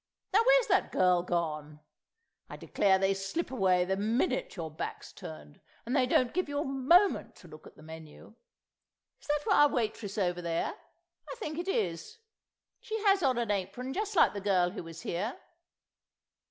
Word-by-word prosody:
Now 410 - +6
where's - - +5
that - - +1
girl 180 -1 +3
gone? 155 -4 -3 0.7
I - - -8
declare 195 -2 +2
they 195 +1 +2
slip 195 - -4
away 185 -7 +2
the 190 +1 0
minute 225 +6 -1
your 165 -4 -5
back's 155 - -7
turned, 75 -2 -11 0.2
and 245 +4 -2
they 260 -3 +3
don't 250 -1 +2
give 365 -4 -1
you 285 - -3
a 295 - -1
moment 275 +9 +3
to 180 - -15
look 155 -1 -13
at - - -16
the 155 - -16
menu. 160 +4 -12 0.9
Is - - -17
that 295 0 -1
our 295 0 +6
waitress 220 -4 -3
over 180 -3 0
there? 170 -1 -2 0.6
I - - -5
think 315 -9 -5
it 350 - -4
is; 195 - -2 0.6
she 445 0 -4
has 395 -2 +4
on 260 -5 +2
an 235 -3 -1
apron 205 +7 -3
just 415 +3 -3
like - - +5
the 200 - -5
girl 185 -3 +2
who 205 - -6
was 165 0 -10
here. 205 +8 -3
205 Hz, 180 wpm, -30 LUFS, 175-285 Hz, 0.9 s, Now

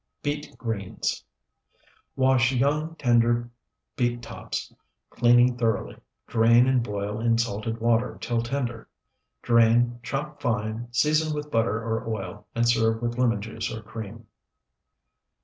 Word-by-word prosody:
BEET 145 0 -4
GREENS 110 -5 -3 0.9
Wash 130 -2 +3
young, 150 +5 0
tender 120 -3 +2 0.4
beet 120 -1 -1
tops, - - -6 0.4
cleaning 120 +1 +4
thoroughly; 115 -3 -1 0.3
drain 115 +1 +5
and 130 -1 +3
boil 105 -1 -3
in 115 0 +2
salted 115 -1 -2
water 115 +1 +1
till 120 -1 -1
tender; 120 -2 -3 0.5
drain, 120 +1 +4
chop 145 +5 -4
fine, 110 0 -2
season 155 +5 +2
with 150 0 -5
butter 115 -2 +1
or 115 0 -3
oil, 95 -5 -5
and 120 0 +2
serve 115 -1 +2
with 120 +1 -3
lemon 115 -5 +2
juice 110 0 -4
or 110 -1 -6
cream. 110 +1 -8
120 Hz, 125 wpm, -26 LUFS, 115-125 Hz, 0.9 s, drain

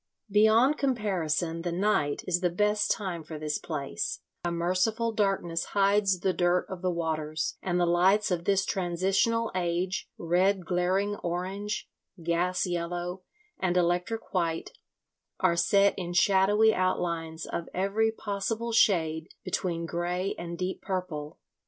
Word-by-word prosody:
Beyond 220 +7 +5
comparison 180 - 0
the 175 0 -2
night 175 -6 +1
is 175 -1 0
the 180 - +2
best 210 +4 +1
time 180 -6 -2
for 155 0 -7
this 150 0 -2
place; 145 -4 -3 0.2
a 175 - -1
merciful 185 +7 0
darkness 195 -6 0
hides 195 -2 +3
the 190 - +1
dirt 175 +1 +2
of 185 -2 -6
the 185 - +1
waters, 155 -2 -2
and 180 -1 0
the 175 - +3
lights 190 +5 +3
of 175 -1 -1
this 195 0 +2
transitional 195 +6 +1
age, 180 +1 -1
red 180 +2 +1
glaring 190 +4 0
orange, 190 +4 -3 0.4
gas 175 +2 +1
yellow, 175 +1 -3 0.4
and 180 -1 +1
electric 180 +6 0
white, 165 -3 -1 0.7
are 170 - +3
set 200 +3 +4
in 175 -1 -4
shadowy 200 +4 +4
outlines 170 -4 -1
of 170 - -5
every 200 +4 +1
possible 220 +2 -3
shade 160 -7 +2 0.2
between 175 -2 -2
grey 175 +3 -2
and 170 0 -6
deep 185 +1 -3
purple. 180 -6 -4
180 Hz, 135 wpm, -28 LUFS, 170-200 Hz, 0.7 s, Beyond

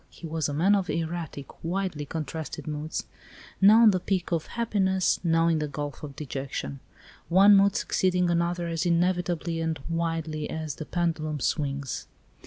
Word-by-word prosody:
He - - -11
was 160 -2 -1
a - - -3
man 185 +7 +4
of 195 -3 +1
erratic, 165 -4 -4
widely 175 -3 -2
contrasted 160 0 -5
moods 155 0 -4 0.6
now 215 +4 +8
on 220 - +8
the 185 - 0
peaks 180 -1 -1
of 165 -2 -1
happiness, 195 -5 +1
now 165 -1 +3
in 165 -2 +2
the 150 - -1
gulf 145 -1 -5
of 145 -2 -8
dejection; 140 -1 -5 0.5
one 195 +4 +7
mood 200 0 +4
succeeding 180 -1 +1
another 170 0 0
as 165 -1 -1
inevitably 175 -1 0
and 160 -1 -1
widely 165 -2 -2
as 155 -2 -4
the 155 - -5
pendulum 160 -3 -1
swings. 140 -1 -2
165 Hz, 160 wpm, -27 LUFS, 155-180 Hz, 0.6 s, now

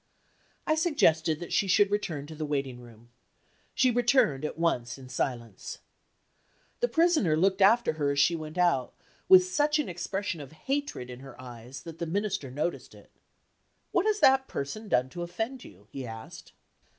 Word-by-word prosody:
I 310 - +2
suggested 175 - +2
that 175 - -6
she 200 - +2
should 200 +2 +4
return 170 -9 -2
to 160 - -10
the 155 0 -5
waiting 135 -4 -2
room. 120 -1 -16 0.7
She 255 -1 +4
returned 240 - +3
at 150 - -4
once 125 -8 0
in 130 -1 -12
silence. 120 -4 -4 1.0
The 485 - +2
Prisoner 320 - +3
looked 190 +3 +2
after 220 0 +5
her 145 - +2
as 140 0 0
she 145 +4 +4
went 155 +1 -7
out, 170 -8 +1 0.3
with 375 -1 +9
such 300 -4 +1
an 300 - -1
expression 185 0 -3
of 140 +1 -11
hatred 270 - -3
in 125 - -9
her 135 -1 -12
eyes 125 +1 -10
that 165 -1 -10
the 170 - -3
Minister 195 -4 -2
noticed 150 +7 -4
it. - - -18 0.8
"What 365 +4 +2
has 420 -1 +1
that 265 0 +5
person 210 +11 -5
done 125 -8 +2
to 175 - -7
offend 225 +9 -4
you?" 100 +1 -15
he 135 -2 -6
asked. 110 0 -10
165 Hz, 175 wpm, -28 LUFS, 135-225 Hz, 1.0 s, with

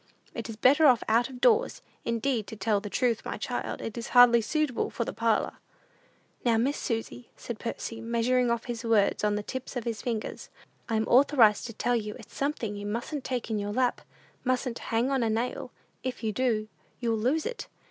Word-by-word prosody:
"It - - -5
is 225 - -5
better 285 +7 +5
off 245 -3 +5
out 235 +3 +3
of 255 -2 -10
doors. - - +3 0.2
Indeed, 235 -1 0
to - - -7
tell 210 0 +1
the 205 0 -7
truth, 240 0 +1
my - - -4
child, - - -4
it 225 - -5
is 230 - -5
hardly 240 -1 +8
suitable 300 +1 0
for 235 - -3
the - - -4
parlor." 225 -2 0 0.9
"Now, 235 -2 +3
Miss 265 +6 +1
Susy," 225 - -4
said 235 -2 -6
Percy, 230 -1 -5
measuring 235 +2 +1
off 235 -1 0
his 235 -2 -5
words 220 -4 +2
on 210 0 +2
the 210 - -2
tips 260 +4 -6
of 245 - -2
his 225 -3 -3
fingers, 230 -3 -4 0.4
"I'm 220 -1 +1
authorized 245 -5 +5
to 230 - -8
tell 240 +3 0
you 210 -2 -3
it's - - -14
something 275 -7 -2
you 205 0 -5
mustn't 240 +6 -3
take 245 -3 -3
in 215 - 0
your 205 0 -3
lap, 250 +1 +1 0.4
mustn't 255 -1 -1
hang 235 +4 +1
on 270 -2 +1
a 230 - +1
nail; 235 +2 -2 0.3
if 255 -2 -5
you 220 - 0
do, 220 -2 0 0.3
you'll 230 -3 0
lose 275 +8 +1
it. 475 0 -5
235 Hz, 200 wpm, -28 LUFS, 220-255 Hz, 0.9 s, hardly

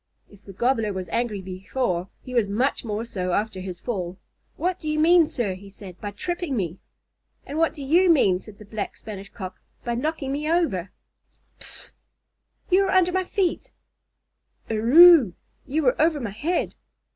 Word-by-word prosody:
If 205 0 -18
the 195 - -9
Gobbler 225 0 +1
was 185 -1 -5
angry 215 0 -1
before, 185 0 -2
he 255 - -8
was 235 -4 +2
much 240 +8 0
more 220 0 -3
so 185 -6 -3
after 210 -1 -1
his 185 -1 -6
fall. 185 -6 -4 0.4
"What 360 +3 -1
do 310 - -4
you 305 - 0
mean, 330 +1 +5
sir," 235 -10 -2
he 195 +2 -11
said, 190 -2 -11
"by 205 - -3
tripping 340 - -3
me?" 180 -2 -3 0.7
"And 295 +3 -4
what 330 0 +2
do 290 - -7
you 345 +7 +4
mean," 200 - +4
said 200 +1 -14
the 210 - -13
Black 210 0 -5
Spanish 200 -2 -9
Cock, 185 -4 -8 0.2
"by 240 - -1
knocking 275 +2 -2
me 295 +2 -2
over?" 250 - +1 0.7
"Pffff! - - -7 0.8
You 390 +2 +5
were - - -1
under 365 -1 +4
my 375 0 0
feet." 390 +7 -1 1.0
"Erruuuu! 255 - +7 0.3
You 305 +3 0
were 250 +1 +2
over 315 -1 +3
my 230 -6 -4
head." 310 - -1
235 Hz, 175 wpm, -24 LUFS, 195-315 Hz, 1.0 s, Erruuuu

